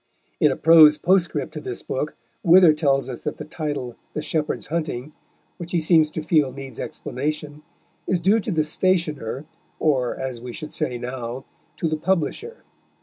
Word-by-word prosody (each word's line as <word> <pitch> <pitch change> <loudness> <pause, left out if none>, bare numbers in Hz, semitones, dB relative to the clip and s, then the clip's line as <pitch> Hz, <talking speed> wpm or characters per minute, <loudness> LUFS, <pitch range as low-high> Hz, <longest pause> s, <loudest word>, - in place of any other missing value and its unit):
In - - +4
a - - -1
prose 155 -2 +7
postscript 170 -6 +1
to 150 - -6
this 125 -5 -6
book 150 +3 -3 0.3
Wither 175 -1 +7
tells 140 -3 +1
us 125 -3 -6
that 150 - -4
the 150 - -7
title, 145 -6 -4 0.2
The 150 - -2
Shepherd's 155 -2 -2
Hunting, 155 -3 -3 0.4
which 175 -1 -7
he 175 - +3
seems 160 -1 +4
to 155 0 -5
feel 155 -4 +2
needs 135 -2 -9
explanation, 150 +2 -4 0.5
is 185 - +1
due 200 +6 +3
to 215 - -3
the 160 -3 +2
stationer, 155 -6 -1 0.3
or, 130 -6 +1
as 130 -3 -4
we 125 0 -7
should 155 - -7
say 130 -6 -2
now, 125 +1 -5 0.3
to 165 - -1
the 155 0 -1
publisher. 190 - -2
150 Hz, 170 wpm, -23 LUFS, 135-165 Hz, 0.5 s, prose